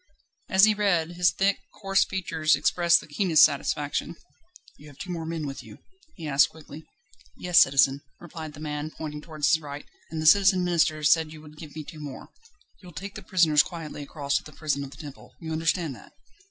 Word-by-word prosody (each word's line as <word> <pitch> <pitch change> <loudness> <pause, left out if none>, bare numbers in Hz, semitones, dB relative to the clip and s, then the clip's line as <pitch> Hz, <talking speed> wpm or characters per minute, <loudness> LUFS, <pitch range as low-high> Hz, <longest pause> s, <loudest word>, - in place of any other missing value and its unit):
As 190 -2 +4
he 215 - +3
read, 185 -6 0
his 175 0 +2
thick, 195 +1 0 0.2
coarse 195 -2 +2
features 165 -5 0
expressed 170 +4 +3
the - - -14
keenest 160 +1 +5
satisfaction. 145 +2 -2 0.6
"You 150 - -16
have 145 -2 -15
two 185 -2 -7
more 165 -2 -5
men 165 -2 -4
with 135 -1 -6
you?" - - -13 0.4
he 165 -5 -7
asked 140 -1 +4
quickly. 160 0 -13 0.5
"Yes, 180 -2 +4
citizen," 135 +1 +4 0.2
replied 160 -3 -9
the - - -12
man, 150 0 -4
pointing 150 -1 -7
towards 155 0 0
his 160 - +2
right; 145 -1 -8 0.2
"and 160 - -5
the 155 - -3
Citizen 190 +1 +5
Minister 160 -3 +1
said 155 +1 +3
you 155 -1 -11
would 150 0 -14
give 155 -3 -11
me 155 - -6
two 155 +1 -11
more." 145 -3 -9 0.5
"You'll 180 -3 -13
take 195 +7 -7
the - - -9
prisoners 165 -6 +3
quietly 165 -4 -7
across 140 0 -2
to - - -6
the 155 - -13
Prison 140 -2 -2
of 140 - -8
the 135 - -14
Temple 145 -3 -12
you 160 -2 -7
understand 165 -1 -1
that?" - - -15
155 Hz, 205 wpm, -26 LUFS, 150-175 Hz, 0.6 s, keenest